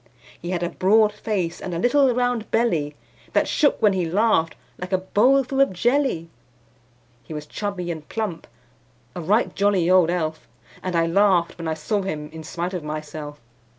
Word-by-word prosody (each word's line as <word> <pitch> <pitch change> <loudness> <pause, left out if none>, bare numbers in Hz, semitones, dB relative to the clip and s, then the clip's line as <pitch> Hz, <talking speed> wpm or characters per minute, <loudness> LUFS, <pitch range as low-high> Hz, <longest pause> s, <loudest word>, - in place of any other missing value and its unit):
He 175 - -5
had 175 -1 -1
a 175 - -1
broad 210 +4 +3
face, 190 -5 -3
and 180 -2 -4
a - - -1
little 255 +7 +3
round 245 -2 -1
belly 165 -11 0 0.4
That - - +2
shook 290 -3 +2
when 205 -2 +5
he 180 -3 -1
laughed, 180 -4 +2 0.2
like 180 +1 -6
a 185 - +3
bowl 245 +9 +3
full 270 +2 0
of 275 - +4
jelly. 240 - 0 0.9
He 155 - -9
was 150 0 -6
chubby 185 0 -4
and 155 -2 -8
plump 215 -7 -4 0.7
a 175 - -4
right 205 +8 +1
jolly 195 -3 +2
old 185 -3 +5
elf; 160 -3 -2 0.3
And 185 -1 -3
I 165 0 +3
laughed 180 -1 +2
when 165 - -4
I 160 - -1
saw 200 +7 -1
him 150 -5 -5
in 160 0 -9
spite 175 +3 -4
of 180 -4 -4
myself. 150 -1 -6
180 Hz, 185 wpm, -23 LUFS, 165-215 Hz, 0.9 s, when